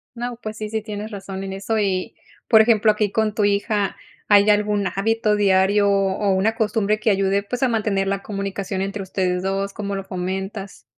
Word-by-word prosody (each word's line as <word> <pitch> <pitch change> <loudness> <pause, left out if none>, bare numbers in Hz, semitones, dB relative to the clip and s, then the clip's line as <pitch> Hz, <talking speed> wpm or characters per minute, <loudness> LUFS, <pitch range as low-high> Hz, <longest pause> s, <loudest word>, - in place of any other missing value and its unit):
No, 240 0 -5
pues 215 0 -6
sí, 215 -1 -5
sí 220 0 -2
tienes 210 0 -6
razón 195 -1 -6
en 195 - -5
eso 200 +3 -2
y, 190 -3 -1 0.3
por 220 -1 +7
ejemplo, 220 -1 +4
aquí 210 -1 -1
con 220 -1 0
tu 210 - +1
hija, 205 0 0 0.3
¿hay 205 0 +5
algún 205 -1 +2
hábito 215 +1 +1
diario 200 0 +3
o 195 0 +1
una 210 +4 +1
costumbre 215 -1 0
que 215 - +2
ayude, 195 +1 +1
pues 245 +5 -5
a - - +4
mantener 210 -4 0
la 195 0 -2
comunicación 195 -1 -4
entre 195 +1 -3
ustedes 185 -1 -1
dos? 195 +1 -2
¿Cómo 200 -1 -4
lo 195 0 -6
comentas? 190 - -5
200 Hz, 190 wpm, -22 LUFS, 195-215 Hz, 0.3 s, por